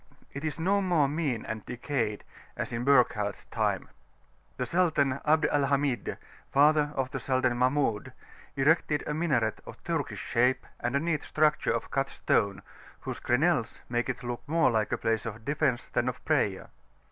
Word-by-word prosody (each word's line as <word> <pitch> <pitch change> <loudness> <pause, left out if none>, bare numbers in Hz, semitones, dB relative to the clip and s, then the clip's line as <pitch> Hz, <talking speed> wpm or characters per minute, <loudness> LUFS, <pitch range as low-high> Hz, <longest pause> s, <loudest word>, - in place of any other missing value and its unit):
It 140 - -6
is 155 -3 -2
no 195 +5 +2
longer 175 -7 +2
"mean 145 -8 -1
and 110 -1 -5
decayed" 120 -4 -3 0.3
as - - -3
in 115 +1 -2
Burckhardt's 120 -7 +2
time: - - -1 0.7
the 125 - -1
Sultan 140 -3 +1
Abd 155 +1 +4
al 145 -2 +2
Hamid, 140 -2 0 0.3
father 150 +1 +4
of 130 -1 -1
[p.409]the - - -3
Sultan 130 -2 +1
Mahmud, 130 -4 +1 0.4
erected 150 +1 +2
a 150 - -2
minaret 135 -9 0
of - - -12
Turkish - - -2
shape 125 +2 +1
and 120 +2 -2
a - - +3
neat 160 0 -1
structure 155 0 +1
of 115 -1 -3
cut 135 0 0
stone, 100 -3 0 0.4
whose - - -5
crenelles 135 0 +1
make 120 +1 -1
it 130 0 -4
look 120 -1 -4
more 165 -3 +3
like 110 -2 0
a - - +1
place 115 -1 -1
of 115 0 -7
defence 140 -4 0
than 120 +1 0
of 125 - -8
prayer. 130 -12 0
135 Hz, 170 wpm, -29 LUFS, 120-150 Hz, 0.7 s, Abd